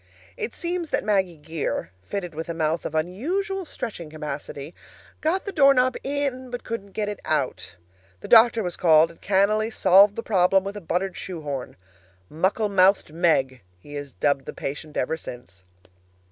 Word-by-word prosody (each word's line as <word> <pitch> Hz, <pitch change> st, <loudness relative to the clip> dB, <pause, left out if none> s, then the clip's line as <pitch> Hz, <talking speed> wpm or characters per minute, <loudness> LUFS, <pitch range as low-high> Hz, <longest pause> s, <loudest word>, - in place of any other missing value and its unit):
It 450 Hz, -2 st, -5 dB
seems 345 Hz, -2 st, -3 dB
that -, -, 0 dB
Maggie 190 Hz, -5 st, +1 dB
Geer, 150 Hz, -, -4 dB
fitted 175 Hz, -, -5 dB
with 160 Hz, +2 st, -6 dB
a 170 Hz, -, -3 dB
mouth 160 Hz, +1 st, -1 dB
of 160 Hz, -, -4 dB
unusual 350 Hz, -, -2 dB
stretching 200 Hz, -, -6 dB
capacity, 150 Hz, 0 st, -6 dB, 0.5 s
got 340 Hz, +5 st, 0 dB
the 400 Hz, -, -3 dB
doorknob 275 Hz, -5 st, +4 dB
in, 275 Hz, -2 st, -2 dB
but 245 Hz, 0 st, -6 dB
couldn't 200 Hz, -4 st, -6 dB
get 210 Hz, -1 st, -2 dB
it 205 Hz, -1 st, -4 dB
out. -, -, -2 dB, 0.5 s
The -, -, -8 dB
doctor 230 Hz, -1 st, +6 dB
was 180 Hz, -1 st, -3 dB
called, 160 Hz, -1 st, +5 dB
and 165 Hz, -, -20 dB
cannily 205 Hz, +3 st, +2 dB
solved 200 Hz, -1 st, +5 dB
the 230 Hz, -, -4 dB
problem 190 Hz, -2 st, +3 dB
with 200 Hz, +1 st, -5 dB
a 205 Hz, -, -6 dB
buttered 180 Hz, +3 st, -2 dB
shoe 180 Hz, -4 st, -6 dB
horn. 140 Hz, -4 st, -5 dB, 0.6 s
"Muckle 190 Hz, +7 st, +1 dB
mouthed 190 Hz, -4 st, +3 dB
Meg," 135 Hz, -7 st, +1 dB, 0.2 s
he 145 Hz, +10 st, -13 dB
has 145 Hz, -1 st, -6 dB
dubbed 140 Hz, -2 st, 0 dB
the -, -, -6 dB
patient 150 Hz, +2 st, -6 dB
ever 160 Hz, +5 st, 0 dB
since. 120 Hz, -, -10 dB
190 Hz, 170 wpm, -24 LUFS, 155-230 Hz, 0.6 s, doctor